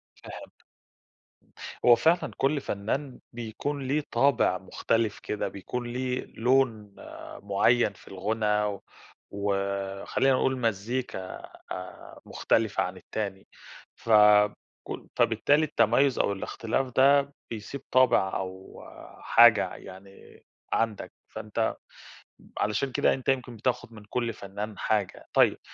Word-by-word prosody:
فهِمتك. - - -12 1.3
هو 120 -1 +8
فعلًا 165 +8 +2
كلّ 140 +1 +1
فنان 125 +7 -3
بيكون 120 +5 -4
ليه 145 +2 0
طابِع 135 -9 +3
مختلِف 110 +3 -1
كده، 105 - -3
بيكون 120 +6 -5
ليه 125 +1 -3
لون 115 -4 0
آآ - - -10
معيّن 105 +2 +2
في - - -20
الغُنى 105 +2 0
و 105 -2 -3 0.5
وخلّينا 100 +5 -1
نقول 130 0 +1
مزّيكا 115 +2 -2 0.5
آآ 90 0 -8
مُختلِفة 110 -2 +1
عن 90 +1 -5
التاني، 95 0 -5 0.5
ف 115 - -12 0.8
كُ - - -7
فبالتالي 145 +2 +3
التميُّز 125 0 +2
أو - - +2
الإختلاف 115 +6 -3
ده 140 +1 +5 0.2
بيسِيب 115 +5 -6
طابِع 125 -7 +3
أو 95 0 -8 0.4
حاجة - - +6
ع - - -8
يعني 95 +1 -14 0.3
عَندك، 115 -2 -1 0.2
فأنت 110 +1 -3 0.8
علشان 105 +6 0
كده، - - +2
أنت 130 0 -3
يمكن 125 -3 -1
بتاخُد 115 0 -2
من 105 - -12
كل 120 -2 -1
فنان 100 +2 -7
حاجة. 105 -4 -1
طيب. - - +4
115 Hz, 115 wpm, -27 LUFS, 100-130 Hz, 1.3 s, هو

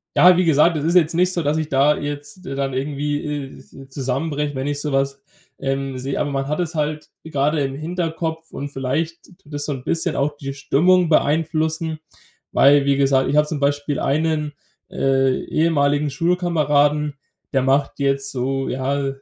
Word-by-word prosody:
ja, 180 0 +7
wie 185 - +3
gesagt, 160 +2 +4
es 145 - -3
ist 170 +3 +1
jetzt 165 -2 +4
nicht 180 +1 +3
so, 175 - 0
dass 150 0 0
ich 155 -1 -2
da 140 +2 +3
jetzt 145 +5 -6
dann 135 0 -3
irgendwie, 145 +2 -2
äh, 145 -2 -5
zu 135 0 -14
zusammenbreche, 145 +2 -2
wenn 130 +1 -3
ich 145 0 -2
so 150 - -3
was, 135 0 0 0.4
ähm, 135 -1 -3
sehe. 135 +2 -3
Aber 145 - 0
man 135 0 -2
hat 150 - -1
es 175 -1 -2
halt 150 0 -2 0.2
grade 150 0 0
im 135 0 -3
Hinterkopf 160 0 -4
und 140 +1 -5
vielleicht 145 +5 -3 0.2
tut 150 -4 -17
das 145 0 -2
so - - -2
'n 130 -2 -7
bisschen 165 0 0
auch 145 +2 0
die 135 -1 -5
Stimmung 175 +6 +3
beeinflussen. 160 +1 +1 0.5
Weil, 140 +1 +5
wie 140 -1 +2
gesagt, 135 -1 +2
ich 150 - +1
habe 150 - +4
zum 150 -1 -3
Beispiel 145 0 0
einen, 150 +1 0 0.4
äh, 135 -1 +1
ehemaligen 145 -2 +1
Schulkameraden, 150 -3 +1 0.4
der 135 - +3
macht 135 +1 +1
jetzt 140 0 0
so, 135 +1 -2
ja, 135 +2 -1
145 Hz, 180 wpm, -21 LUFS, 135-160 Hz, 0.5 s, ja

